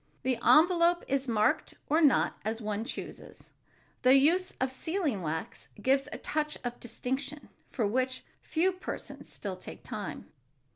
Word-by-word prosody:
The 255 Hz, -2 st, 0 dB
envelope 345 Hz, +1 st, +5 dB
is 275 Hz, 0 st, 0 dB
marked 215 Hz, -2 st, +1 dB
or 315 Hz, +3 st, +3 dB
not, 290 Hz, -5 st, +4 dB
as 220 Hz, +2 st, -2 dB
one 210 Hz, -1 st, -2 dB
chooses. -, -, -8 dB, 0.5 s
The 255 Hz, +1 st, +6 dB
use 340 Hz, +7 st, +4 dB
of 260 Hz, 0 st, 0 dB
sealing 310 Hz, -, -1 dB
wax 160 Hz, -1 st, -4 dB
gives 270 Hz, +5 st, +2 dB
a -, -, -4 dB
touch 300 Hz, 0 st, -2 dB
of 245 Hz, -1 st, -4 dB
distinction 265 Hz, +5 st, -4 dB, 0.2 s
for 235 Hz, -, -1 dB
which 255 Hz, +4 st, 0 dB, 0.2 s
a -, -, -26 dB
few 350 Hz, +4 st, +2 dB
persons 370 Hz, 0 st, -7 dB
still 195 Hz, -3 st, -5 dB
take 185 Hz, -, -10 dB
time. 205 Hz, -3 st, -6 dB
260 Hz, 150 wpm, -30 LUFS, 225-310 Hz, 0.5 s, The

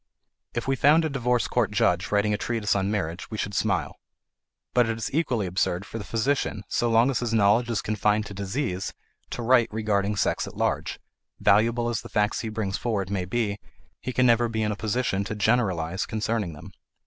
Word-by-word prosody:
If 120 Hz, -, -2 dB
we 135 Hz, -, +2 dB
found 150 Hz, +5 st, +4 dB
a -, -, 0 dB
divorce 125 Hz, -2 st, +1 dB
court 120 Hz, -4 st, +1 dB
judge 90 Hz, -3 st, +1 dB
writing 105 Hz, 0 st, +2 dB
a -, -, +1 dB
treatise 110 Hz, -2 st, -1 dB
on 95 Hz, 0 st, 0 dB
marriage 95 Hz, -4 st, -3 dB
we 110 Hz, -, -5 dB
should 100 Hz, -1 st, -3 dB
smile. -, -, -1 dB, 0.7 s
But 120 Hz, -2 st, +3 dB
it 115 Hz, -, -1 dB
is 115 Hz, -, -4 dB
equally 130 Hz, -9 st, +1 dB
absurd 90 Hz, +1 st, -1 dB
for 115 Hz, -, -6 dB
the -, -, -5 dB
physician, 115 Hz, -2 st, -1 dB
so 120 Hz, -, 0 dB
long 115 Hz, +4 st, +4 dB
as 130 Hz, -, 0 dB
his 115 Hz, -2 st, -1 dB
knowledge 110 Hz, +3 st, +3 dB
is 115 Hz, -3 st, -1 dB
confined 105 Hz, 0 st, +1 dB
to 100 Hz, -, -8 dB
disease, 100 Hz, 0 st, -3 dB, 0.3 s
to 120 Hz, -, -4 dB
write 120 Hz, -1 st, +4 dB
regarding 105 Hz, -1 st, 0 dB
sex -, -, 0 dB
at -, -, -10 dB
large; -, -, -1 dB, 0.4 s
valuable 115 Hz, +4 st, +3 dB
as 120 Hz, -1 st, -1 dB
the -, -, -11 dB
facts 105 Hz, 0 st, +1 dB
he 115 Hz, -, -3 dB
brings 105 Hz, -3 st, -2 dB
forward 100 Hz, -5 st, -2 dB
may 95 Hz, -3 st, -1 dB
be, 105 Hz, +1 st, -1 dB, 0.4 s
he 130 Hz, -, -4 dB
can 125 Hz, 0 st, +2 dB
never 120 Hz, -1 st, +4 dB
be 110 Hz, -1 st, -1 dB
in 105 Hz, -, 0 dB
a -, -, -2 dB
position 105 Hz, -2 st, -1 dB
to 110 Hz, -, -4 dB
generalize 95 Hz, -6 st, +1 dB
concerning 110 Hz, -4 st, -2 dB
them. 75 Hz, -, -11 dB
110 Hz, 205 wpm, -26 LUFS, 100-120 Hz, 0.7 s, found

